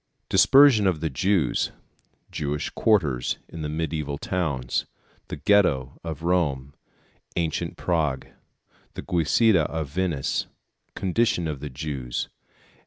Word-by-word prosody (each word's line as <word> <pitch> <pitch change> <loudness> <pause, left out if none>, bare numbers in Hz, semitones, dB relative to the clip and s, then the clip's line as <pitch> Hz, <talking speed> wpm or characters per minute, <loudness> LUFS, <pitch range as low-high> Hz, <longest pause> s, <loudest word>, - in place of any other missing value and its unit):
Dispersion 110 +1 +6
of 90 -4 +1
the 80 -1 -2
Jews. 90 -1 +1 0.6
Jewish 75 0 -3
Quarters 75 - +1
in 80 - -8
the 75 - -2
Mediæval 75 -2 -3
Towns. 70 -9 -2 0.4
The - - -5
Ghetto 80 -11 +2
of 80 -2 -6
Rome. 70 -6 0 0.6
Ancient 85 -2 -2
Prague. 75 -7 0 0.7
The - - -6
Giudecca 90 +1 +3
of 80 -2 -4
Venice. 85 -4 -1 0.5
Condition 95 -2 +1
of 75 -3 -4
the 75 +1 -6
Jews. 65 -3 -4
80 Hz, 110 wpm, -25 LUFS, 70-90 Hz, 0.7 s, Dispersion